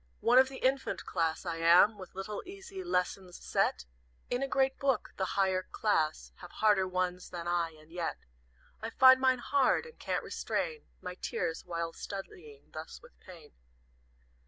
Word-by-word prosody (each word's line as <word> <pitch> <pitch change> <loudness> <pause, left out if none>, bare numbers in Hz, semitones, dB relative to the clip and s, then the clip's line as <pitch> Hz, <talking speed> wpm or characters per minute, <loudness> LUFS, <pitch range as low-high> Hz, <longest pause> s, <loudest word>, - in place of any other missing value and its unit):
"One 245 +2 +6
of 260 0 +5
the 265 - -8
infant 265 +1 0
class 165 0 -1
I 170 -2 -2
am 170 +6 +6
With 185 -1 -11
little, 195 +2 -4
easy 385 0 -9
lessons, 180 - -2
set - - 0 0.5
In 245 +1 0
a 275 - 0
great 265 0 +1
book; 275 -2 0
the 190 0 -2
higher 190 -1 +2
class 160 -6 -1
Have 180 - -11
harder 205 -3 +3
ones 180 0 -2
than 175 -1 -6
I, 170 -2 0
and 155 +1 -19
yet 170 -1 -3 0.6
I 225 - -3
find 260 +2 +7
mine 260 -1 +4
hard, 270 - +2
and 475 - -14
can't - - -2
restrain 465 -2 -3 0.2
My 180 - -4
tears 165 -2 -3
while 170 -1 -3
studying 160 -7 -9
thus 155 +1 -8
with 240 - -18
Pain. 170 -6 -14
190 Hz, 165 wpm, -31 LUFS, 170-260 Hz, 0.6 s, find